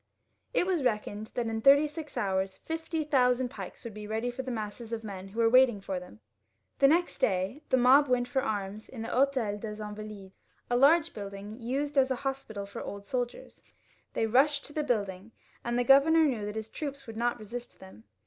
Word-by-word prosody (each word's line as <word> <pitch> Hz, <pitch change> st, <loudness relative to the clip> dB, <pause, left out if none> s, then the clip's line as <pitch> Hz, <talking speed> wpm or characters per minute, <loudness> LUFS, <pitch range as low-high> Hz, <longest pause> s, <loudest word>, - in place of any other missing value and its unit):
It -, -, +2 dB
was 365 Hz, -4 st, +1 dB
reckoned 215 Hz, -2 st, -1 dB
that 240 Hz, -, 0 dB
in 225 Hz, -1 st, -2 dB
thirty 280 Hz, +4 st, +7 dB
six 300 Hz, 0 st, -7 dB
hours 190 Hz, -1 st, -1 dB
fifty 325 Hz, 0 st, -3 dB
thousand 255 Hz, -3 st, +2 dB
pikes -, -, -9 dB
would 230 Hz, -3 st, -7 dB
be 210 Hz, 0 st, -8 dB
ready 225 Hz, +3 st, -2 dB
for 250 Hz, +2 st, -5 dB
the 260 Hz, -, -6 dB
masses 220 Hz, 0 st, -5 dB
of 225 Hz, -1 st, -3 dB
men 195 Hz, -3 st, -7 dB
who 210 Hz, +4 st, -7 dB
were 230 Hz, -, +5 dB
waiting 250 Hz, -2 st, +5 dB
for 190 Hz, -1 st, -4 dB
them. 110 Hz, -12 st, -14 dB, 0.6 s
The 275 Hz, -, +7 dB
next 340 Hz, +4 st, +2 dB
day 190 Hz, +8 st, 0 dB
the 260 Hz, -, +4 dB
mob 260 Hz, +4 st, +6 dB
went 250 Hz, -1 st, +1 dB
for 265 Hz, +1 st, 0 dB
arms 205 Hz, -1 st, -3 dB
to -, -, -16 dB
the -, -, -9 dB
H6tel 225 Hz, 0 st, -4 dB, 0.4 s
of 205 Hz, -, -7 dB
the 225 Hz, -, -4 dB
InvaUdes, 210 Hz, -2 st, -7 dB, 0.4 s
a -, -, +3 dB
large 310 Hz, +6 st, +5 dB
building 200 Hz, +2 st, -7 dB
used 280 Hz, +4 st, 0 dB
as 265 Hz, 0 st, +3 dB
a 260 Hz, -, +1 dB
hospital 245 Hz, -7 st, -3 dB
for 200 Hz, -, -8 dB
old 200 Hz, 0 st, -7 dB
soldiers. 245 Hz, +2 st, -4 dB, 0.5 s
They 225 Hz, -, +1 dB
rushed 280 Hz, +6 st, +3 dB
to 295 Hz, -, -11 dB
the 305 Hz, -, 0 dB
building, 205 Hz, -5 st, -2 dB, 0.3 s
and 240 Hz, 0 st, -1 dB
the 245 Hz, -, +2 dB
governor 280 Hz, +5 st, +6 dB
knew 230 Hz, -8 st, -1 dB
that 210 Hz, -, -5 dB
his 220 Hz, 0 st, -5 dB
troops 280 Hz, -2 st, -5 dB
would 225 Hz, -2 st, -9 dB
not 240 Hz, +2 st, 0 dB
resist 235 Hz, +3 st, -8 dB
them. 190 Hz, -, -14 dB
235 Hz, 210 wpm, -29 LUFS, 210-270 Hz, 0.6 s, thirty